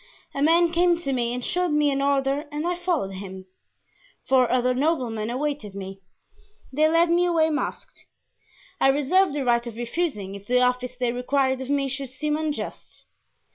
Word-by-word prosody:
A 275 - -3
man 335 +3 +4
came 345 0 +3
to 275 -5 -3
me 240 -2 0
and 245 0 -3
showed 360 0 0
me 300 -1 +2
an 275 0 -1
order 275 +1 +1
and 300 +2 -3
I 355 +1 0
followed 345 - -1
him. 190 -1 -8 0.8
Four 255 -2 +3
other 250 0 +2
noblemen 250 -6 -1
awaited 260 -5 -3
me. 195 0 -7 0.7
They 305 +3 +4
led 335 +1 +3
me 350 +1 +3
away 325 -2 +2
masked. 300 - -5 0.7
I - - +4
reserved 290 +6 +3
the 280 -3 -2
right 240 0 +2
of 230 - -7
refusing 240 - -3
if 200 0 -10
the 250 +1 +3
office 250 0 0
they 245 -1 -1
required 260 +1 0
of 260 - -6
me 280 -1 +1
should 270 0 -5
seem 295 +4 -2
unjust. 310 -1 -5
275 Hz, 175 wpm, -24 LUFS, 245-310 Hz, 0.8 s, man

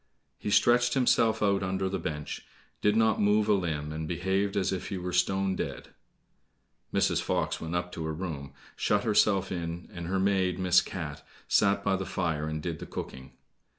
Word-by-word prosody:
He - - -3
stretched 120 +4 +4
himself 115 -4 +3
out 100 -1 +2
under 95 0 -1
the 95 0 -2
bench, 75 -2 -5 0.4
did 105 0 +3
not 110 0 +3
move 105 +1 +3
a - - +5
limb, 80 -6 -1
and 80 0 -4
behaved 95 +4 0
as 95 -1 +1
if 95 - -4
he 95 - -3
were 90 0 -4
stone 95 +1 +1
dead. - - -5 1.0
Mrs. - - +2
Fox - - -1
went 80 +1 -4
up 90 0 -2
to 80 - -5
her 80 - -2
room, 75 -6 -5 0.2
shut 105 -1 +1
herself 105 -3 +3
in, 85 -1 -4
and 85 -1 -6
her 95 +2 0
maid, 95 -2 +2
Miss 95 -1 +4
Cat, 75 -6 -6 0.2
sat 100 -1 +3
by 95 - +2
the 95 -1 -4
fire, 80 -5 -1
and 80 -1 -4
did 80 -3 -3
the - - -7
cooking. 65 0 -7
95 Hz, 185 wpm, -29 LUFS, 85-100 Hz, 1.0 s, a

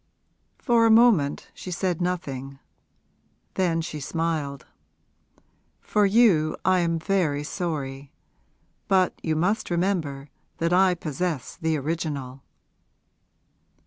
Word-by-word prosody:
For 235 -3 +3
a - - +3
moment 220 -11 +4
she - - -9
said 180 -1 -2
nothing; 140 -7 -3 1.0
then 170 -3 +1
she 155 -2 -5
smiled. 150 -2 -3 1.1
'For 210 -1 +2
you, 195 -8 +4
I 185 0 +4
am 165 -1 +1
very 160 -5 0
sorry. 145 -5 -4 0.8
But 190 -2 +3
you 160 -1 -1
must 180 +8 0
remember 170 -6 -1 0.3
that 170 +1 0
I 185 0 +4
possess 155 -3 -3
the 160 -1 -1
original!' 140 -3 -4
165 Hz, 105 wpm, -25 LUFS, 145-185 Hz, 1.1 s, moment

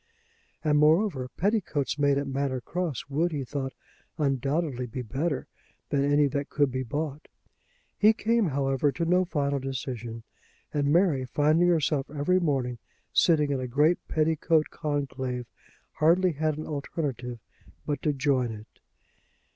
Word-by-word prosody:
And, 150 -2 +3
moreover, 150 -4 +3
petticoats 175 - 0
made 140 -1 +3
at 140 - -1
Manor 135 -1 -1
Cross 165 +1 -3
would, 160 +5 0
he 145 -3 -2
thought, 135 0 -4 0.4
undoubtedly 140 -2 0
be 125 +2 -5
better 140 +5 -2 0.4
than 140 -1 +1
any 145 +1 +4
that 140 +2 -3
could 145 -3 +2
be 130 +1 -2
bought. 145 +4 -4 0.7
He 210 +1 +7
came, 225 -1 +1
however, 135 0 +1
to 170 - -1
no 180 +2 +3
final 140 -5 -1
decision; 125 -4 -5 0.5
and 145 -1 +1
Mary, 165 -6 +3
finding 155 +6 +3
herself 155 -5 +1
every 150 +5 +1
morning 130 -8 -1 0.3
sitting 150 -4 +4
in 135 - 0
a 130 - -3
great 150 +7 +3
petticoat 160 0 +1
conclave, 135 -5 -3 0.5
hardly 175 +4 +3
had 155 0 -1
an 155 - -5
alternative 140 -4 -4 0.5
but 145 -3 -2
to 150 - +1
join 135 -4 +1
it. 110 0 -11
145 Hz, 140 wpm, -27 LUFS, 135-160 Hz, 0.7 s, He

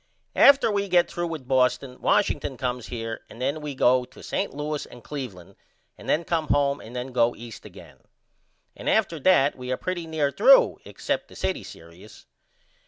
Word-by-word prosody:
After 275 -5 +6
we 200 -1 -1
get 175 -1 +3
threw 175 0 -2
with 155 -6 -7
Boston, 130 0 +1
Washington 140 -9 +1
comes 125 -1 -3
here 115 -2 -5
and 115 - -13
then 140 +4 -2
we 150 -2 -5
go 130 0 +3
to - - -15
St. - - -2
Louis 150 +1 -4
and 120 -2 -14
Cleveland 100 -10 -8 0.4
and - - -10
then 160 - +2
come 165 -2 -1
home 140 0 +1
and 115 +3 -11
then 125 +1 -4
go 120 -1 +2
East 115 -1 -11
again. - - -14 0.8
And - - -4
after 195 -7 +1
that 145 -3 +4
we 125 0 -6
are 130 - 0
pretty 175 -3 -4
near 155 -3 0
threw - - +5
except - - -3
the - - -16
city 190 - -2
serious. 85 +6 -14
140 Hz, 180 wpm, -25 LUFS, 125-165 Hz, 0.8 s, After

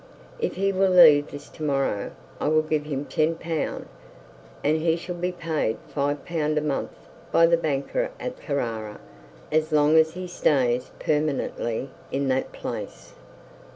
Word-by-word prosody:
'If 465 - -1
he 195 +1 +1
will 195 0 +2
leave 155 -5 +7 0.3
to 155 - -8
morrow, 135 -8 0 0.3
I - - -1
will 155 +1 +3
give 155 -1 -1
him 140 -3 -3
L 160 +1 +2
10, 165 -3 -2 0.8
and 155 +2 +3
he 160 +1 +2
shall 175 +1 -5
be 175 +1 -2
paid 160 -10 -1 0.2
L 145 0 +1
5 145 - -16 0.3
a - - +2
month 150 -2 -2 0.4
by 165 - +6
the 170 0 +5
banker 160 - -1
at 250 0 -6
Carrara 115 -8 -3 0.5
as 155 +1 +1
long 150 +1 +4
as 160 +1 +4
he 185 0 -5
stays 130 -8 +1
permanently 140 -4 -1 0.2
in 135 0 0
that 130 0 0
place.' - - -7
155 Hz, 155 wpm, -25 LUFS, 140-165 Hz, 0.8 s, leave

